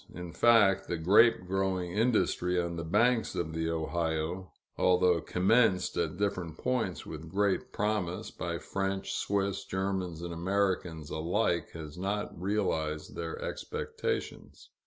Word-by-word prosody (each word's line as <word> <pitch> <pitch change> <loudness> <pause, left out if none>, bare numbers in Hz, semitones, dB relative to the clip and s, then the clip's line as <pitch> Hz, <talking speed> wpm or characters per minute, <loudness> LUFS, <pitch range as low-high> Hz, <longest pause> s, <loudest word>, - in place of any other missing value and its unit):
In 90 -1 -7
fact, 100 -5 +5
the 85 - -2
grape 100 +4 +5
growing 95 -1 -1
industry 100 -4 +1
on 85 -1 -2
the 85 - -4
banks 115 +8 +2
of 80 -2 -2
the 80 0 -1
Ohio, 80 +2 -2 0.2
although 90 -2 +3
commenced 95 +2 +2
at 85 0 -1
different 95 -5 -2
points 115 -8 -1
with 80 +1 -8
great 100 +2 0
promise, 105 -4 -1
by - - -3
French, 95 0 -3
Swiss, 100 -1 -1
Germans, 95 -3 -2
and 85 -1 -4
Americans 90 -3 -1
alike, 85 +1 0
has 80 0 -8
not 100 +2 -2
realized 80 -6 -1
their 85 -1 -4
expectations. - - -4
90 Hz, 130 wpm, -30 LUFS, 85-100 Hz, 0.2 s, fact